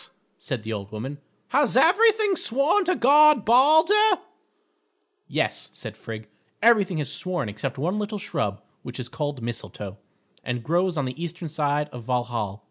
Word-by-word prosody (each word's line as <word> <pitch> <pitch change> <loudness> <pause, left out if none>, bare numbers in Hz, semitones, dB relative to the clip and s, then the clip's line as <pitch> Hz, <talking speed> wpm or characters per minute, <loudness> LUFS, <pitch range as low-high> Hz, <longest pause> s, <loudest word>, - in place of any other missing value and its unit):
said 125 -5 -5
the 110 0 -4
old 100 -1 -6
woman, 130 +7 -6 0.3
"has 275 -4 +2
everything 420 +5 +4
sworn 290 - +1
to 365 0 +1
guard 295 -2 +5
Balder?" 315 - +5 1.1
"Yes," - - -2
said - - -8
Frigg, 110 -1 -8 0.3
"everything 205 -6 +4
has 145 -2 -2
sworn 180 -8 -2
except 105 +6 -5
one 180 +9 -1
little 210 0 -3
shrub 105 - -3 0.2
which 125 +1 -7
is 125 - -4
called 145 -5 -4
Mistletoe, 105 -4 -6 0.4
and 125 -1 -3
grows 175 +3 0
on 145 - 0
the 130 +6 -5
eastern 170 0 -6
side 150 -1 0
of 125 -4 -9
Valhal. 120 -5 -2
160 Hz, 150 wpm, -24 LUFS, -, 1.1 s, guard